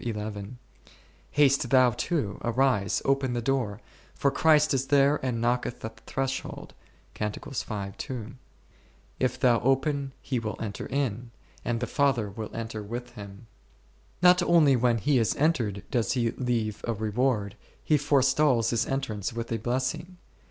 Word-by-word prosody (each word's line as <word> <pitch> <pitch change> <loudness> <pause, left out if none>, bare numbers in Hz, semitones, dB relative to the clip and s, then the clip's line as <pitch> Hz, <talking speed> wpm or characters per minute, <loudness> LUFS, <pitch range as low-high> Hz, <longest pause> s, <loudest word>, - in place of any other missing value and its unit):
25 115 -3 -3
Lamb 105 0 -4
in 100 - -5
haste - - -8
m, - - -17 0.7
haste 140 -3 +3
thou 130 -1 +5
too, 120 - -2
arise, 120 -4 +1
open 135 -2 +1
the 120 - -1
door, 120 -6 -1 0.4
for 140 - +1
Christ 155 -1 +4
is 135 0 0
there 140 +1 +3
and 125 -3 -1
knocketh 120 0 -1
at 110 - -7
the 115 - -20
threshold 135 0 -4 0.5
11: 110 +3 -5 0.8
if 130 -1 0
thou 120 -2 +4
open, 135 +2 0
He 130 -3 -2
will 110 -2 -4
enter 105 -3 -5
in, 125 -4 -2 0.3
and 120 0 -1
the 120 - -1
Father 120 -5 +1
will 110 +2 -6
enter 115 -1 -4
with 120 +4 -6
Him. 100 +1 -11 0.8
Not 180 0 +7
only 165 -6 +5
when 120 -1 +2
He 135 +3 +2
is 110 -5 +1
entered 120 - 0
does 120 -3 +1
He 120 -3 +1
leave 115 -4 -2
a 115 - 0
reward; 110 -1 0 0.3
He 155 - +3
forestalls 135 -3 +3
His 115 0 0
entrance 115 -7 -3
with 115 0 -5
a 115 - 0
blessing. 130 - -2
125 Hz, 160 wpm, -27 LUFS, 110-135 Hz, 0.8 s, Not